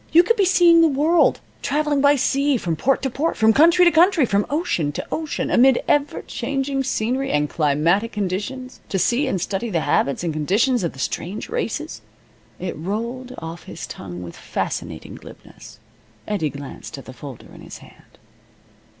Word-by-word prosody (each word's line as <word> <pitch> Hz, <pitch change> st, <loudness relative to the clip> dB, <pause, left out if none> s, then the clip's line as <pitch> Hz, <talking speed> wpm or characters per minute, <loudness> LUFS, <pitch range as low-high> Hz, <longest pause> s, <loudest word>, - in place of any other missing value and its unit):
You 335 Hz, +3 st, +7 dB
could 465 Hz, +6 st, +2 dB
be 405 Hz, -4 st, +2 dB
seeing 345 Hz, -2 st, +5 dB
the 330 Hz, -, +6 dB
world, 310 Hz, +4 st, +2 dB, 0.2 s
traveling 295 Hz, -1 st, 0 dB
by 285 Hz, +1 st, +5 dB
sea 275 Hz, +1 st, +1 dB
from 170 Hz, -7 st, -2 dB
port 270 Hz, -, +1 dB
to 265 Hz, -, 0 dB
port, 305 Hz, +7 st, -1 dB
from 220 Hz, 0 st, +4 dB
country 335 Hz, +6 st, +5 dB
to 345 Hz, -, +6 dB
country, 335 Hz, -1 st, +4 dB
from 200 Hz, -2 st, 0 dB
ocean 285 Hz, -, -1 dB
to -, -, -5 dB
ocean, 315 Hz, -1 st, -3 dB
amid 260 Hz, 0 st, +5 dB
ever 290 Hz, 0 st, +1 dB
changing 270 Hz, 0 st, -2 dB
scenery 260 Hz, +2 st, -1 dB
and 150 Hz, 0 st, +1 dB
climatic 165 Hz, +9 st, +1 dB
conditions, 210 Hz, +7 st, -4 dB
to 195 Hz, -, -1 dB
see 245 Hz, +9 st, +1 dB
and 195 Hz, -8 st, -1 dB
study 200 Hz, +6 st, -3 dB
the 170 Hz, -6 st, 0 dB
habits 140 Hz, +2 st, 0 dB
and 165 Hz, -2 st, -1 dB
conditions 200 Hz, -, +1 dB
of 170 Hz, -, -2 dB
the -, -, -15 dB
strange 180 Hz, +9 st, -4 dB
races 475 Hz, +1 st, -4 dB, 0.3 s
" -, -, -33 dB
It 180 Hz, -1 st, -4 dB
rolled 235 Hz, +9 st, -4 dB
off 165 Hz, +1 st, -8 dB
his -, -, -7 dB
tongue 90 Hz, -2 st, -8 dB
with 85 Hz, -1 st, -9 dB
fascinating -, -, -5 dB
glibness. -, -, -13 dB, 0.5 s
Eddie 195 Hz, -8 st, -1 dB
glanced 140 Hz, 0 st, -9 dB
at 135 Hz, -, -11 dB
the 130 Hz, -, -10 dB
folder 130 Hz, 0 st, -11 dB
in -, -, -13 dB
his -, -, -10 dB
hand. -, -, -19 dB
240 Hz, 180 wpm, -21 LUFS, 170-290 Hz, 0.5 s, You